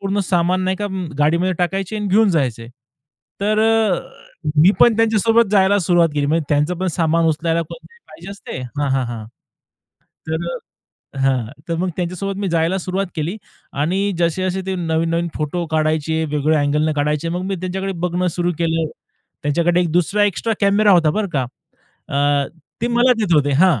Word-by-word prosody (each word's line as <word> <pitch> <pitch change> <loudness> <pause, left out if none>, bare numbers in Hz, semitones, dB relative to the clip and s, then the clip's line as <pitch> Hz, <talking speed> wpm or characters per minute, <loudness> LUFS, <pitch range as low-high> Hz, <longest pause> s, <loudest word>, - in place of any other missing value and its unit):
पूर्ण 195 +1 -1
सामान 180 0 +1
नाही 185 0 0
का 205 - -3 0.3
गाडीमध्ये 170 +5 +2
टाकायचे 195 +4 -1
आणि 210 -1 -3
घेऊन 210 +2 +4
जायचे. 125 -8 -1 0.7
तर 215 +1 +1
अ, 220 -4 +2 0.6
मी 165 +6 +7
पण 230 -2 +6
त्यांच्यासोबत 225 0 +3
जायला 200 0 +4
सुरुवात 175 -2 +3
केली. 145 -1 0
म्हणजे 160 +1 +1
त्यांचं 150 +4 +1
पण 190 - -1
सामान 165 0 +2
उचलायला 165 +1 +1
कोणतरी 255 - -13
पाहिजे 175 +4 -11
असते. 200 -9 -8 0.2
हां, 140 -2 0
हां, 135 -1 +1
हां. 115 -2 -6 1.0
तर 160 +2 -2 0.7
अ, - - -7
हां. 135 -3 +1 0.2
तर 165 - 0
मग 180 +1 -1
त्यांच्यासोबत 185 +2 -3
मी 200 - -1
जायला 165 +3 +1
सुरुवात 190 +2 -2
केली 160 +5 -2 0.5
आणि 195 +6 0
जसे-जसे 185 +3 0
ते 190 - -2
नवीन-नवीन 165 0 0
फोटो 160 +3 -2
काढायचे 155 0 0
वेगळ्या 150 +1 +2
अँगलने 150 +2 +1
काढायचे. 150 +2 0
मग 175 +2 -2
मी 195 0 -2
त्यांच्याकडे 190 +1 -3 0.2
बघणं 180 +1 -1
सुरु 175 0 +1
केलं. 165 -1 0 0.6
त्यांच्याकडे 170 +4 +2
एक 170 - 0
दुसरा 180 +5 +2
एक्स्ट्रा 205 +3 0
कॅमेरा 200 +1 +4
होता 170 -4 +5
बरं 210 +1 -1
का? 130 -3 +1 0.6
अ, 140 0 +1 0.3
ते 235 - +1
मला 245 +1 +5
देत 190 -6 +2
होते 145 -1 +3
हां. 170 - +4
175 Hz, 170 wpm, -19 LUFS, 155-195 Hz, 1.0 s, मी